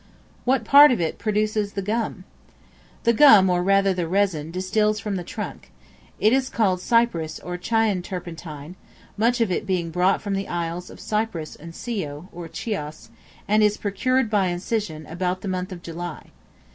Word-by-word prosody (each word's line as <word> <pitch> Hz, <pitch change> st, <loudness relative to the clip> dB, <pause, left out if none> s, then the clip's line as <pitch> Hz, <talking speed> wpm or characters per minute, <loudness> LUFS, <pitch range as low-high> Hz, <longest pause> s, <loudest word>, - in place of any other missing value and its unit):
What 255 Hz, -2 st, +2 dB
part 285 Hz, +4 st, +8 dB
of 245 Hz, -, +1 dB
it 165 Hz, -2 st, -2 dB
produces 215 Hz, -1 st, 0 dB
the 195 Hz, -, -3 dB
Gum? 215 Hz, -2 st, -2 dB, 0.8 s
The 235 Hz, -, +4 dB
gum, 215 Hz, -8 st, +7 dB
or 175 Hz, 0 st, +2 dB
rather 195 Hz, +1 st, +3 dB
the 175 Hz, -2 st, -2 dB
resin, 180 Hz, -4 st, 0 dB
distils 210 Hz, +4 st, 0 dB
from 205 Hz, 0 st, -3 dB
the 180 Hz, -, -3 dB
trunk. 170 Hz, -, -7 dB, 0.5 s
It 215 Hz, +3 st, +4 dB
is 265 Hz, -1 st, +1 dB
called 190 Hz, -5 st, +1 dB
Cyprus 185 Hz, -9 st, +1 dB
or 180 Hz, -, -6 dB
Chian 210 Hz, +1 st, +1 dB
Turpentine, 165 Hz, -3 st, -7 dB, 0.4 s
much 235 Hz, +3 st, +1 dB
of 220 Hz, -5 st, +1 dB
it 190 Hz, -, -2 dB
being 175 Hz, -3 st, -1 dB
brought 180 Hz, +3 st, +2 dB
from 200 Hz, -2 st, -4 dB
the 195 Hz, 0 st, -2 dB
isles 175 Hz, +1 st, -4 dB
of -, -, -12 dB
Cyprus 210 Hz, -8 st, -3 dB
and 165 Hz, +1 st, -11 dB
Scio, 180 Hz, -8 st, -5 dB
or 170 Hz, -1 st, -8 dB
Chios, 155 Hz, -9 st, -5 dB, 0.4 s
and 215 Hz, +1 st, +3 dB
is 210 Hz, 0 st, +3 dB
procured, 230 Hz, +4 st, 0 dB
by 200 Hz, -3 st, +2 dB
incision, 175 Hz, -3 st, -3 dB
about 180 Hz, +3 st, -3 dB
the -, -, -6 dB
month 185 Hz, 0 st, -3 dB
of 175 Hz, -2 st, -8 dB
July. 170 Hz, -1 st, -7 dB
190 Hz, 170 wpm, -23 LUFS, 175-215 Hz, 0.8 s, part